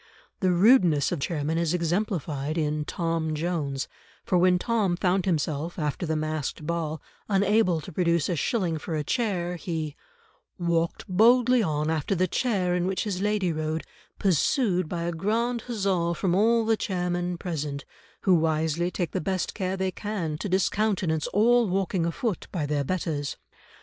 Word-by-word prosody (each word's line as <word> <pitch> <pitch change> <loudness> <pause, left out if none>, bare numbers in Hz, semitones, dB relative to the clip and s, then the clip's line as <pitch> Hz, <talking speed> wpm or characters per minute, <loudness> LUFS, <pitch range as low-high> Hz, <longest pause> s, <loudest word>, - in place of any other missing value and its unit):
The 185 -3 +2
rudeness 180 - +5
of 175 - -1
chairmen 155 +2 -1
is 170 0 +1
exemplified 170 - -1
in 150 -1 0
Tom 165 -2 -1
Jones, 150 -4 -2 0.4
for - - 0
when 180 0 +4
Tom 210 -3 +1
found 185 0 +1
himself 160 -1 -1
after 155 +1 -2
the 160 - 0
masqued 155 -1 -3
ball 160 -1 -2 0.3
unable 200 -3 +3
to - - -9
produce 170 -2 +1
a 175 - 0
shilling 170 - 0
for 160 +1 -4
a 150 - -1
chair, 180 - -1
he 160 -3 -4 0.6
"walked 170 -2 -1
boldly 240 +5 +5
on 155 -4 0
after 160 +4 0
the 185 +1 +2
chair 190 -4 0
in 180 0 0
which 190 0 -1
his 195 -4 -3
lady 205 -4 +1
rode, 155 +1 -2 0.3
pursued 185 - +2
by 170 -2 -3
a 170 - -1
grand 225 +7 -1
huzza 190 -7 0
from 180 -1 0
all 225 +4 +3
the 225 0 +3
chairmen 175 -2 -2
present, 150 -6 -4 0.4
who 190 - +4
wisely 160 +1 +1
take 175 -3 -3
the - - -2
best 185 +3 -2
care 190 -1 -2
they 190 0 0
can 185 -6 -3
to 205 - -3
discountenance 190 -4 +1
all 235 +1 +3
walking 185 -2 0
afoot 195 +2 -2
by 165 -6 -2
their 145 -1 0
betters. 150 -3 -2
175 Hz, 160 wpm, -26 LUFS, 160-195 Hz, 0.6 s, rudeness